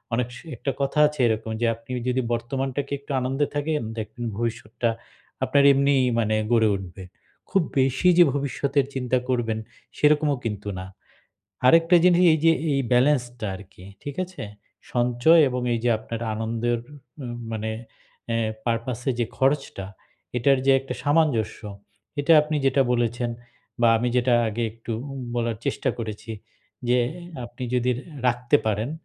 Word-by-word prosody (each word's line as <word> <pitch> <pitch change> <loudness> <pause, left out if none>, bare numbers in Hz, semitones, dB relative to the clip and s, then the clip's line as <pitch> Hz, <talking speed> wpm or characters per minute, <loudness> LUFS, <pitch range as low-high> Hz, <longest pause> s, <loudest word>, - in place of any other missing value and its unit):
অনেক 120 0 0
স - - -9 0.2
একটা 135 +4 -2
কথা 140 +2 0
আছে 150 -1 -8
এরকম 110 0 -1
যে, - - +3
আপনি 115 +2 -13 0.2
যদি 130 +1 +1
বর্তমানটাকে 135 +4 -3
একটু 140 - -10
আনন্দে 135 +3 0
থাকেন, 150 +1 0 0.2
দেখবেন 110 +2 -5
ভবিষ্যৎটা 115 0 -2 0.5
আপনার 140 +2 +3
এমনি 140 +1 +3 0.2
মানে 110 -1 +1 0.2
গড়ে 115 -2 +4
উঠবে। 95 0 -8 0.5
খুব 195 - +2 0.2
বেশি 130 +5 +2
যে 175 - +9
ভবিষ্যতের 140 0 0
চিন্তা 130 -1 0
করবেন, 115 -3 0 0.4
সেরকমও 150 -2 +3
কিন্তু 105 -2 -4
না। 95 - -6 0.8
আরেকটা 165 +5 +6
জিনিস 180 0 +5
এইযে 165 +1 +4 0.2
এ - - +1 0.2
ব্যালেন্সটা 125 -3 +2
আরকি, 95 -1 -13 0.2
ঠিক 145 - -6
আছে? 185 0 -10 0.5
সঞ্চয় 125 +7 +4
এবং 125 0 -2
এইযে 115 +1 -1
আপনার 115 +1 -6
আনন্দের 115 +2 -1 0.5
উ - - -6 0.3
মানে 110 0 -3 0.6
অ্যা 115 0 0 0.3
purpose 115 +1 -2
এ - - +1
যে 120 - +1
খরচটা, 135 -8 0 0.5
এটার 135 +2 +3
যে - - +6
একটা 135 - -6
সামঞ্জস্য, 145 -7 +1 0.6
এটা 145 +3 +3
আপনি 150 0 -2
যেটা 135 +1 +4
বলেছেন 120 0 0 0.5
বা, 120 - +5
আমি 120 +2 0
যেটা 125 0 +3
আগে 115 +2 -3
একটু 115 +1 -7 0.2
উ - - -6 0.2
বলার 115 -1 -1
চেষ্টা - - -1
করেছি 110 0 -6 0.6
যে, 125 +1 +4 0.5
আপনি 120 +2 -11
যদি 125 0 +2
রে - - -8 0.3
রাখতে 125 +3 +2
পারেন 110 +4 -1
125 Hz, 150 wpm, -24 LUFS, 115-140 Hz, 0.8 s, যে